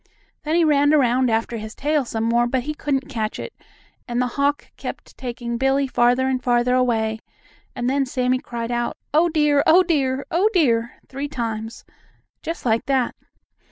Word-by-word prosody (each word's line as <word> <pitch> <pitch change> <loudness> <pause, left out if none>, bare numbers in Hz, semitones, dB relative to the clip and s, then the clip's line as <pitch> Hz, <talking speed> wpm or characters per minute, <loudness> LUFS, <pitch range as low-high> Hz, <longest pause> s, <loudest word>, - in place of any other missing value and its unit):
Then 310 +1 -1
he 340 - +4
ran 290 0 +4
around 255 -2 +3
after 225 +1 -1
his 215 0 -8
tail 295 -1 0
some 225 -1 -3
more, 235 +1 +2
but 250 0 -1
he 305 +3 -3
couldn't 280 -2 -2
catch 225 -6 -3
it, - - -7 0.5
and 240 -1 -2
the 250 - +2
hawk 285 +1 0
kept - - -8
taking 240 -2 -5
Billie 270 +1 +2
farther 250 0 +2
and 255 -1 -1
farther 245 0 +2
away, 225 -3 +1 0.6
and 245 -1 -2
then 270 +1 +1
Sammie 255 0 0
cried 235 -1 -5
out: 240 0 -2 0.2
"Oh, 330 +3 +4
dear! 300 -3 +3
Oh, 355 +4 +7
dear! 275 -6 0
Oh, 370 +6 +3
dear!" 235 -8 +2
three 275 +2 -5
times, 225 -5 -5 0.6
just 330 -3 -5
like 230 -1 +1
that. 265 -3 +1
255 Hz, 175 wpm, -22 LUFS, 240-285 Hz, 0.6 s, Oh